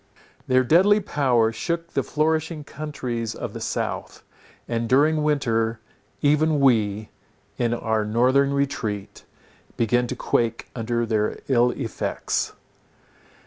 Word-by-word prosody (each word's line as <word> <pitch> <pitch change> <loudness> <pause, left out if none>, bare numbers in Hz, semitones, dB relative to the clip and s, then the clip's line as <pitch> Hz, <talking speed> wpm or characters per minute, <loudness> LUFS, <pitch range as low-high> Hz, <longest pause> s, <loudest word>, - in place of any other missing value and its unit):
Their 130 0 +4
deadly 190 - +5
power 125 - +2
shook 170 +8 -3
the - - +1
flourishing 155 0 -1
countries 125 -7 -4
of - - -6
the - - -7
south, - - -4 0.4
and 115 -1 -2
during 150 +4 +4
winter, 115 -7 0 0.4
even, 150 +1 +3
we, 110 -6 +2 0.5
in 120 -1 +1
our 110 -2 0
northern 130 +6 +3
retreat, 120 -8 -3 0.5
began 120 +2 +2
to 125 - -4
quake 115 -2 -1
under 120 0 -1
their 110 -2 0
ill 125 -2 +4
effects. 120 -3 -2
125 Hz, 115 wpm, -24 LUFS, 115-150 Hz, 0.5 s, deadly